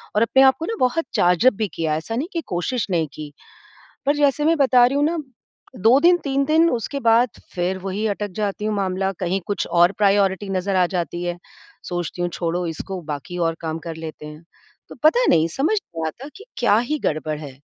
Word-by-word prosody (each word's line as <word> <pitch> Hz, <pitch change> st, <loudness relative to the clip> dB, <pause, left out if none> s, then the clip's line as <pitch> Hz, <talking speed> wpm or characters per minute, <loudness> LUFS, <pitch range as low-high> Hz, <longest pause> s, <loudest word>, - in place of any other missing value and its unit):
और 210 Hz, -, +3 dB
अपने 265 Hz, +4 st, +4 dB
आप 265 Hz, 0 st, +6 dB
को 325 Hz, -, -3 dB
ना 455 Hz, -, -3 dB
बहुत 295 Hz, +6 st, +1 dB
चार्ज 180 Hz, +6 st, +2 dB
अप 255 Hz, -, +6 dB
भी 210 Hz, +1 st, -2 dB
किया 160 Hz, -2 st, -2 dB
है, 155 Hz, -, +1 dB
ऐसा 225 Hz, +8 st, -5 dB
नहीं 285 Hz, +8 st, -2 dB
कि 335 Hz, -, -1 dB
कोशिश 190 Hz, +7 st, -2 dB
नहीं 165 Hz, -3 st, +1 dB
की। 150 Hz, -1 st, -8 dB, 0.8 s
पर 290 Hz, +1 st, +3 dB
जैसे 290 Hz, 0 st, +2 dB
मैं 330 Hz, +1 st, +3 dB
बता 255 Hz, -3 st, +5 dB
रही 275 Hz, +3 st, -1 dB
हूँ 290 Hz, -, +2 dB
ना, 330 Hz, +2 st, 0 dB, 0.6 s
2 225 Hz, +7 st, +5 dB
दिन, 350 Hz, +1 st, +6 dB
3 275 Hz, 0 st, +1 dB
दिन, 320 Hz, +3 st, +4 dB
उसके 250 Hz, +4 st, -3 dB
बाद 235 Hz, +2 st, +4 dB, 0.3 s
फ़िर 180 Hz, +1 st, -1 dB
वही 200 Hz, +3 st, -2 dB
अटक 205 Hz, -1 st, -5 dB
जाती 205 Hz, 0 st, -2 dB
हूँ 215 Hz, 0 st, 0 dB
मामला, 190 Hz, 0 st, -1 dB
कहीं 185 Hz, +1 st, -2 dB
कुछ 205 Hz, -2 st, -2 dB
और 175 Hz, +2 st, +4 dB
प्रायोरिटी 200 Hz, -1 st, +2 dB
नज़र 190 Hz, +1 st, -1 dB
आ 180 Hz, -1 st, +4 dB
जाती 175 Hz, 0 st, -3 dB
है। 175 Hz, 0 st, -3 dB, 0.5 s
सोचती 175 Hz, 0 st, -3 dB
हूँ 175 Hz, -, 0 dB
छोड़ो 175 Hz, +1 st, -2 dB
इसको 180 Hz, +4 st, -5 dB
बाकी 160 Hz, +5 st, -6 dB
और 165 Hz, -1 st, +1 dB
काम 160 Hz, -1 st, -3 dB
कर 160 Hz, -, -5 dB
लेते 160 Hz, -1 st, -8 dB
हैं। 150 Hz, +2 st, -11 dB, 0.4 s
तो -, -, -10 dB
पता 480 Hz, +11 st, +5 dB
नहीं, 160 Hz, +1 st, +4 dB
समझ 295 Hz, -, 0 dB
नहीं 165 Hz, -, -6 dB
आता 260 Hz, -, -7 dB
कि 425 Hz, -, -12 dB
क्या 210 Hz, -, +4 dB
ही 295 Hz, +6 st, -1 dB
गड़बड़ 155 Hz, -1 st, -1 dB
है। 140 Hz, -3 st, -10 dB
195 Hz, 220 wpm, -21 LUFS, 175-265 Hz, 0.8 s, आप